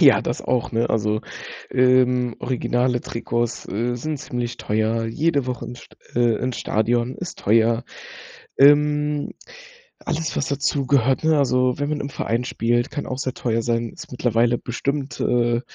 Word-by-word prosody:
Ja, - - +7
das - - -3
auch, 125 -2 -1
ne? 115 +1 +1
Also, 110 -1 +1 0.5
ähm, 125 -1 +3
originale 125 0 0
Trikots, 120 0 -2
äh, 120 +5 -1
sind 150 +4 -3
ziemlich 120 -4 -4
teuer, 110 +2 0
jede 140 +2 0
Woche 125 -2 -4
ins 120 +1 -8
St - - -18 0.2
äh, 120 -2 +3
ins 125 0 -3
Stadion 120 +3 0
ist 180 - -7
teuer. 115 +3 +3 0.7
Ähm, 150 +1 +4 0.7
alles, 160 -1 -3
was 140 - -1
dazugehört, 135 -1 +1
ne? 160 -1 +4
Also, 125 -2 +2
wenn 145 - -1
man 150 -1 -1
im 140 - -4
Verein 120 -2 -1
spielt, 120 +1 0
kann 145 - -4
auch 130 +1 -4
sehr 130 -2 -2
teuer 115 -1 0
sein, 115 0 -1
ist - - -11
mittlerweile 120 -1 +2
bestimmt, 135 +2 -3
äh, 120 0 +2
125 Hz, 155 wpm, -22 LUFS, 115-140 Hz, 0.7 s, Ja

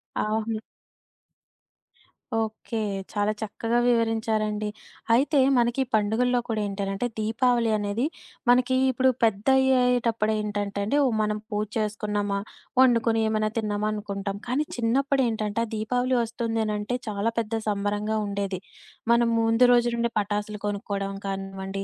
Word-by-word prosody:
అవును. 220 +1 -1 1.8
ఓకే. 225 +1 -2 0.3
చాలా 205 0 +1
చక్కగా 225 +2 -1
వివరించారండి. 220 -2 +1 0.4
అయితే 280 +5 +3 0.2
మనకి 240 +2 +2
పండుగల్లో 225 +4 +2
కూడా 220 -2 -1
ఏంటనంటే, 195 +3 -2
దీపావళి 230 +1 +2
అనేది 205 +5 -1 0.4
మనకి 250 +1 +4 0.2
ఇప్పుడు 260 +1 +3
పెద్దయ్యేటప్పుడేంటంటేండి, 220 -2 +2 0.2
మనం 210 0 0
పూజ 210 0 -1
చేసుకున్నామా, 210 -1 -1 0.4
వండుకుని 230 -3 +4
ఏమన్నా 215 0 +1
తిన్నామా, 210 -1 -1
అనుకుంటాం. 200 -1 -4
కానీ 270 +5 0
చిన్నప్పుడేంటంటే, 235 -3 +1
ఆ 220 - -12
దీపావళి 245 +4 0
ఒస్తుందనంటే 225 0 -2
చాలా 210 +2 -1
పెద్ద 225 -1 -3
సంబరంగా 205 +1 -1
ఉండేది. 200 -2 -2 0.5
మనం 235 0 +4
ముందు 225 +2 +4
రోజు 240 0 +4
నుండే 235 0 0
పటాసులు 210 +1 -2
కొనుక్కోవడం 200 -1 -3
కానివ్వండి, 195 0 -4
220 Hz, 105 wpm, -26 LUFS, 205-235 Hz, 1.8 s, మనకి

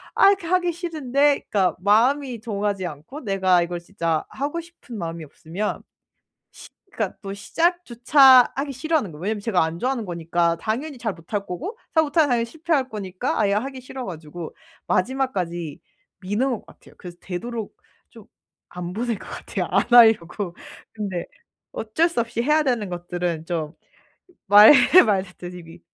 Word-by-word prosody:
아 - - +6
이렇게 390 -4 0
하기 355 -1 +1
싫은데 290 -5 0
그러니까 190 -3 +1
마음이 240 +5 +2
동하지 205 -3 -2
않고 160 - -8
내가 190 -5 +2
이걸 170 0 -3
진짜 170 -3 -2
하고 290 +5 -3
싶은 330 -8 -12
마음이 165 -3 -5
없으면 170 +8 -5 0.7
시 - - -13 0.2
그러니까 210 -4 -3
또 195 0 -5
시작조차 265 - +4
하기 275 +1 -2
싫어하는 275 - -1
거예요. 150 - -11
왜냐하면 210 0 -1
제가 200 -7 +2
안 165 +1 -4
좋아하는 250 -3 -2
거니까 170 0 0
당연히 265 +6 -3
잘 225 -4 -2
못할 180 +5 -4
거고 365 - -6 0.2
잘 320 - +5
못하면 295 0 +2
당연히 235 -1 +1
실패할 310 -2 -1
거니까 195 -4 -3
아예 200 -1 +2
하기 260 +5 -3
싫어 255 -1 -7
가지고 160 -1 -8 0.3
마지막까지 185 - -2 0.4
미는 205 +8 -1
것 225 - -5
같아요. - - -18
그래서 175 -2 -10
되도록 220 +4 -6 0.3
좀 - - -15 0.4
안 180 0 -6
보는 230 -2 -2
것 - - -12
같아요. - - -4
안 - - +3
하려고. 210 -6 +4 0.4
근데 195 -5 -4 0.5
어쩔 240 +11 0
수 335 - -2
없이 235 0 -2
해야 300 +4 +3
되는 235 -7 0
것들은 175 -2 -3
좀 160 -3 -3 0.7
말 205 +5 +9 0.3
말했듯이 180 -3 -3
미 165 +1 -14
210 Hz, 345 characters per minute, -23 LUFS, 180-265 Hz, 0.7 s, 말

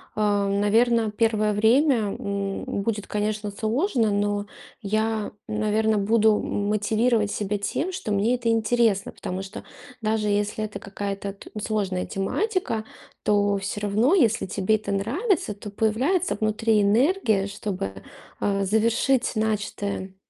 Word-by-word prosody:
а, 205 -2 +1
наверно, 220 +3 +2
1 215 -1 +1
время, 225 0 +3
м, 200 -1 -3 0.2
будет, 210 0 -2
конечно, 210 0 -2
сложно, 225 - 0
но 205 0 0 0.3
я, 215 +1 -1 0.2
наверно, 215 0 +1
буду, 220 +2 +4
м 205 0 -2
мотивировать 215 +1 +1
себя 205 0 -1
тем, 320 - -2
что 355 - -4
мне 205 +4 +2
это 240 -2 -1
интересно. 225 -2 +2
Потому 185 +1 -5
что 195 - -8 0.4
даже 215 -1 0
если 205 +1 0
это 205 -2 -5
какая-то 200 0 -5
т 200 - -14
сложная 195 -5 -1
тематика, 295 - -1 0.4
то 205 -1 +2
всё 200 +1 -4
равно, 215 - +3
если 230 - +3
тебе 200 +2 +1
это 215 -2 -4
нравится, 250 - 0
то 205 +1 -9
появляется 250 - +1
внутри 215 0 +2
энергия, 220 - +2
чтобы, 200 - -4 0.5
а, 200 -1 0
завершить 230 +6 +2 0.2
начатое. 205 -3 -2
215 Hz, 130 wpm, -24 LUFS, 200-225 Hz, 0.5 s, буду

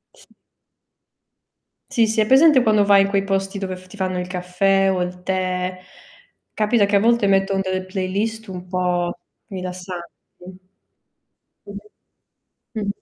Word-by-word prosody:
S - - -19 1.7
Sì, 230 -2 +3
sì, 220 0 -1
hai 215 - +4
presente 265 +2 +6
quando 215 -2 +3
vai 200 -1 +5
in 195 - -2
quei 200 -1 +1
posti 195 0 -2
dove 190 -1 -4
f 185 0 -14
ti 185 - -14
fanno 185 -2 -2
caffè 190 +2 +1
o 185 -1 -1
il 180 0 -7
tè, 185 0 -2 0.7
capita 215 0 +2
che 205 - +1
a - - +5
volte 230 0 +3
mettono 195 0 +2
delle 185 -1 -3
playlist 200 +4 -3
un 180 -2 -8
po' 180 -1 -1 0.3
rilassanti. 180 -2 -6 1.6
Mh-mh. 200 +1 -13 0.7
Mh-mh. 205 - -3
195 Hz, 140 wpm, -21 LUFS, 185-205 Hz, 1.7 s, presente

